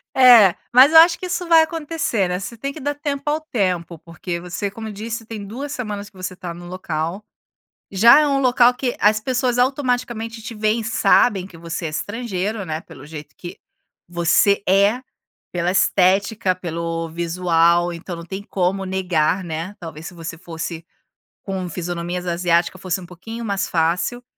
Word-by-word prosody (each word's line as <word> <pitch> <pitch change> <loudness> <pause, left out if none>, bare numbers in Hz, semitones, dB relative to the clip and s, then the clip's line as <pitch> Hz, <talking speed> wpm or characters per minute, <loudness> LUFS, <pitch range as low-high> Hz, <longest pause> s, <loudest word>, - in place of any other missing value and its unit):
É, 235 -8 +8 0.2
mas 260 +5 +7
eu 320 - +9
acho 335 +1 +6
que 370 - -6
isso 360 -1 -3
vai 325 -1 +7
acontecer, 315 - -2
né, 180 +1 -2
você 200 +5 -7
tem 275 +5 -4
que 310 - -10
dar 290 +1 -2
tempo 285 -1 -4
ao 310 +1 0
tempo. 180 - -2
Porque, 170 +2 -6
você 180 +3 -4
como 220 +1 -7
disse, 225 +2 -6
tem 215 -2 -7
2 270 +8 -6
semanas 210 -6 -5
que - - -31
você 185 0 -6
tá 180 -3 -7
no 175 +1 -11
local, 175 +2 -4 0.7
já 235 +9 +7
é 300 - +2
um 275 -1 +1
local 250 -1 +5
que 245 -1 -3
as 215 +1 +3
pessoas 250 0 -1
automaticamente 245 -4 -1
te 225 +1 -8
veem 215 +2 0
e - - -6
sabem 210 -3 +3
que 170 -4 -14
você 170 +1 -5
é - - -2
estrangeiro, 205 +2 -3
né, 160 -1 -4
pelo 135 - -14
jeito 150 -2 -10
que 175 +1 -9 0.5
você 175 +4 +2
é, 200 +6 +3 0.5
pela 175 0 0
estética, 195 +1 +2
pelo 165 -2 -4
visual, 170 0 +2
então 170 +1 -7
não 170 - -9
tem 190 +3 -6
como 195 0 -1
negar, 185 -2 0
né? 165 +4 -5
Talvez 165 -1 -8
se 185 - -9
você 165 -1 -7
fosse 165 -1 -7 0.6
com 190 -2 -4
fisionomias 175 +1 -4
asiáticas 170 0 0
fosse 185 0 -2
um 175 - -10
pouquinho 225 +7 -8
mais 200 -2 -2
fácil, 175 +9 0
195 Hz, 175 wpm, -21 LUFS, 170-235 Hz, 0.7 s, eu